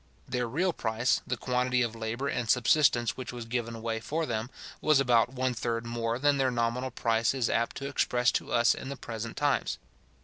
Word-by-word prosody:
Their 125 -1 -1
real 175 +8 +1
price, 115 0 0
the 125 - -1
quantity 125 +1 +1
of 115 -1 -3
labour 115 +4 -3
and 120 -5 -2
subsistence 125 -1 +3
which 130 -3 -6
was 120 -2 -7
given 115 0 -3
away 115 0 -3
for 160 +8 -2
them, 110 -3 -3 0.3
was 155 -3 +4
about 120 -3 +3
one 130 -1 0
third 115 0 -2
more 115 0 -2
than 145 +2 +3
their 135 -1 +2
nominal 120 +1 -1
price 115 0 +1
is 125 -3 0
apt 115 +1 0
to 140 - -4
express 125 -3 +2
to - - -2
us 120 0 +4
in 130 - -7
the 140 - -5
present 115 0 -6
times. - - +1
120 Hz, 200 wpm, -29 LUFS, 115-130 Hz, 0.3 s, was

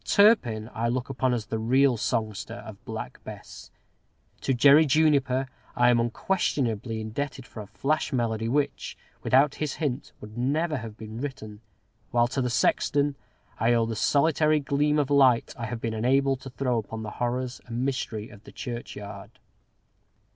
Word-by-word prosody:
Turpin 140 - +4
I 115 +1 -1
look 125 +2 -2
upon 130 -1 0
as 120 -3 -1
the 110 +1 -3
real 130 +3 +3
songster 110 -3 -2
of - - -11
"Black - - -7
Bess;" - - -10 0.7
to - - -1
Jerry 140 +5 +6
Juniper 140 -3 +3 0.3
I 120 0 +5
am 120 - +3
unquestionably 115 - -1
indebted 130 +5 -4
for 110 - -9
a 105 - -9
flash 155 +9 -1
melody 115 -3 -1
which, 145 +3 -1 0.2
without 140 +2 +4
his 150 -3 -1
hint, 140 -4 -3
would 105 +1 -11
never 150 +5 0
have 115 -3 -8
been 110 +1 -7
written, 110 -7 -6 0.5
while 120 0 +3
to 135 +1 -1
the 125 - 0
sexton 145 +4 +1 0.4
I 115 +2 +3
owe 115 -1 +3
the 115 0 -3
solitary 155 +4 +3
gleam 145 +1 +1
of 145 -1 0
light 130 -4 +4
I 115 -2 -5
have 115 +1 -4
been 115 -1 -3
enabled 135 +4 +2
to 135 - -8
throw 125 -2 0
upon 110 +1 -6
the 105 - -5
horrors 125 +1 -2
and 120 +2 -2
mystery 115 -5 -3
of 100 0 -15
the - - -13
churchyard. 110 -2 -7
125 Hz, 165 wpm, -26 LUFS, 115-140 Hz, 0.7 s, Jerry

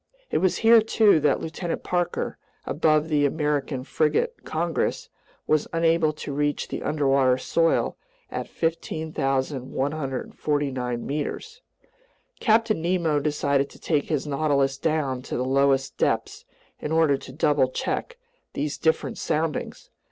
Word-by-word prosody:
It - - +2
was 185 - +2
here 230 0 +8
too 215 -5 +4
that 145 -2 +2
Lieutenant 165 +1 -4
Parker, 175 -1 -2 0.3
aboard 155 0 +2
the 150 -2 +2
American 145 -3 -1
frigate 150 +2 0
Congress, 165 -2 -2 0.4
was 155 -1 +1
unable 165 -1 +2
to 150 -1 -7
reach 145 +1 -1
the - - -4
underwater 135 -4 +2
soil 165 +5 +1 0.3
at - - -4
15,149 135 -4 -2
meters. 295 - -4 0.8
Captain 220 -5 +2
Nemo 170 -3 +1
decided 140 -1 0
to - - -15
take 150 -3 0
his 150 -3 -1
Nautilus 140 -2 +1
down 145 -5 0
to - - -5
the 125 - -1
lowest 135 0 +2
depths - - -1 0.3
in 150 - -4
order 160 -3 +4
to 135 - -11
double 140 -2 +2
check 485 - -3 0.4
these 145 +1 -3
different 160 - 0
soundings. 155 0 -2
150 Hz, 125 wpm, -25 LUFS, 140-165 Hz, 0.8 s, here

